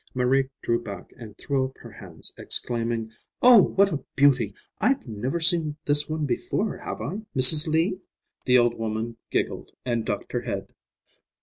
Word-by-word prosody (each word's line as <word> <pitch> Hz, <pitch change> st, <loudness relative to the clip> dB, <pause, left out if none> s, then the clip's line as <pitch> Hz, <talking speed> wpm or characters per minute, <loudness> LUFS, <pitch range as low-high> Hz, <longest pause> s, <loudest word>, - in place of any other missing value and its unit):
Marie 130 Hz, +1 st, 0 dB
drew 115 Hz, 0 st, -1 dB
back 100 Hz, -4 st, -10 dB
and 110 Hz, -3 st, -13 dB
threw 140 Hz, -2 st, -2 dB
up 130 Hz, -, -11 dB
her 115 Hz, -, -14 dB
hands, 90 Hz, -7 st, -6 dB
exclaiming, 115 Hz, -2 st, -1 dB, 0.3 s
"Oh, 245 Hz, -4 st, +7 dB
what 200 Hz, +1 st, +1 dB
a 145 Hz, -, -5 dB
beauty! 125 Hz, -7 st, +2 dB, 0.2 s
I've 250 Hz, -, -1 dB
never 120 Hz, +9 st, -4 dB
seen 160 Hz, -3 st, +2 dB
this 145 Hz, +1 st, +5 dB
one 155 Hz, -1 st, -3 dB
before, 120 Hz, -4 st, -3 dB
have -, -, -8 dB
I, 195 Hz, +7 st, -5 dB, 0.2 s
Mrs. 150 Hz, +5 st, +9 dB
Lee?" 165 Hz, +4 st, -1 dB, 0.5 s
The 125 Hz, 0 st, +4 dB
old 120 Hz, -1 st, +2 dB
woman 115 Hz, +1 st, -5 dB
giggled -, -, -4 dB, 0.2 s
and 120 Hz, -2 st, -2 dB
ducked -, -, -5 dB
her -, -, -3 dB
head. -, -, -7 dB
130 Hz, 165 wpm, -23 LUFS, 115-155 Hz, 0.5 s, Mrs